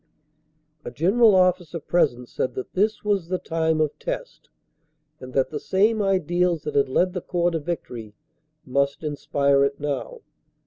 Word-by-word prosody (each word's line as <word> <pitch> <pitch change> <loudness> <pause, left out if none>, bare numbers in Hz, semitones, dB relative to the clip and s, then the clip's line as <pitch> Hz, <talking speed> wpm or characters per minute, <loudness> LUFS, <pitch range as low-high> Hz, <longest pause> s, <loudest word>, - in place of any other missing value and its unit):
A - - -5
General 205 +6 +4
Officer 180 -3 +2
present 135 -7 0
said 130 - -3
that 130 - -6
this 210 +3 0
was 200 -5 0
the 185 +1 -1
time 160 -2 -1
of 155 -2 -1
test, - - -6 0.7
and 130 0 -9
that 135 +2 +1
the 150 - -3
same 210 +6 +2
ideals 180 -3 +1
that 150 - -4
had 140 -2 +2
led 180 +7 +1
the 180 - -3
Corps 175 0 0
to 165 - -1
victory 120 -10 -6 0.5
must 140 +3 0
inspire 140 -2 +1
it 140 0 -1
now. 150 - -4
165 Hz, 155 wpm, -24 LUFS, 140-185 Hz, 0.7 s, General